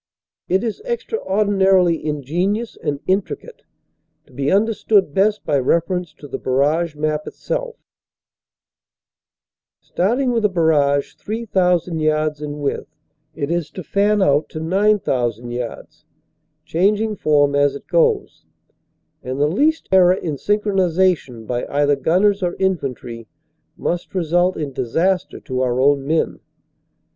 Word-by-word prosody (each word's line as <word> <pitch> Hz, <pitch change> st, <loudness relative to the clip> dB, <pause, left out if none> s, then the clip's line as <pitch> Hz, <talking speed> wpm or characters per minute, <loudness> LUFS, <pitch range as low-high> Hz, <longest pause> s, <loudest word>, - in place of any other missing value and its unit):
It 190 Hz, +3 st, +2 dB
is 230 Hz, -, -3 dB
extraordinarily 195 Hz, -, +1 dB
ingen 155 Hz, +7 st, -1 dB
ious 235 Hz, 0 st, -7 dB
and 145 Hz, -1 st, -4 dB
intricate, 200 Hz, -, -2 dB, 0.6 s
to 135 Hz, -, -22 dB
be 140 Hz, +2 st, -1 dB
understood 205 Hz, -4 st, +2 dB
best 210 Hz, +4 st, +1 dB
by 145 Hz, -, +2 dB
reference 170 Hz, +5 st, 0 dB
to 145 Hz, -, -12 dB
the -, -, -5 dB
barrage 150 Hz, +5 st, +1 dB
map 155 Hz, 0 st, -2 dB
itself. -, -, -4 dB, 2.0 s
Starting 245 Hz, +8 st, 0 dB
with 230 Hz, -2 st, 0 dB
a 210 Hz, -, +4 dB
barrage 150 Hz, -5 st, +2 dB
3,000 180 Hz, -6 st, 0 dB
yards 155 Hz, -1 st, 0 dB
in 150 Hz, 0 st, -5 dB
width, 140 Hz, -, -2 dB, 0.5 s
it 140 Hz, +3 st, -3 dB
is 170 Hz, -3 st, -1 dB
to 185 Hz, -, -8 dB
fan 205 Hz, +3 st, +2 dB
out 145 Hz, -1 st, +2 dB
to 155 Hz, -, -6 dB
9,000 155 Hz, -, 0 dB
yards, 120 Hz, -1 st, -7 dB, 0.6 s
changing 210 Hz, +5 st, +1 dB
form 145 Hz, -5 st, +2 dB
as 145 Hz, -1 st, +2 dB
it 140 Hz, -, -9 dB
goes, 470 Hz, -3 st, 0 dB, 0.7 s
and 130 Hz, +2 st, -5 dB
the 145 Hz, -, +3 dB
least 300 Hz, -, +1 dB
error 185 Hz, -1 st, +6 dB
in 170 Hz, -5 st, -4 dB
synchronization 185 Hz, -, 0 dB
by 120 Hz, +2 st, -3 dB
either 145 Hz, 0 st, +2 dB
gunners 195 Hz, +8 st, +2 dB
or 175 Hz, -1 st, -1 dB
infantry 125 Hz, -, -3 dB, 0.5 s
must 175 Hz, +2 st, -3 dB
result 175 Hz, +1 st, +1 dB
in 150 Hz, -3 st, -3 dB
MARCHING -, -, -14 dB
UP -, -, -21 dB
TO -, -, -1 dB
BATTLE 120 Hz, -2 st, -6 dB
215 185 Hz, +2 st, +1 dB
disaster -, -, -10 dB
to 130 Hz, -1 st, -3 dB
our 125 Hz, -1 st, 0 dB
own 140 Hz, 0 st, +2 dB
men. 160 Hz, +1 st, 0 dB
170 Hz, 140 wpm, -20 LUFS, 145-200 Hz, 2.0 s, error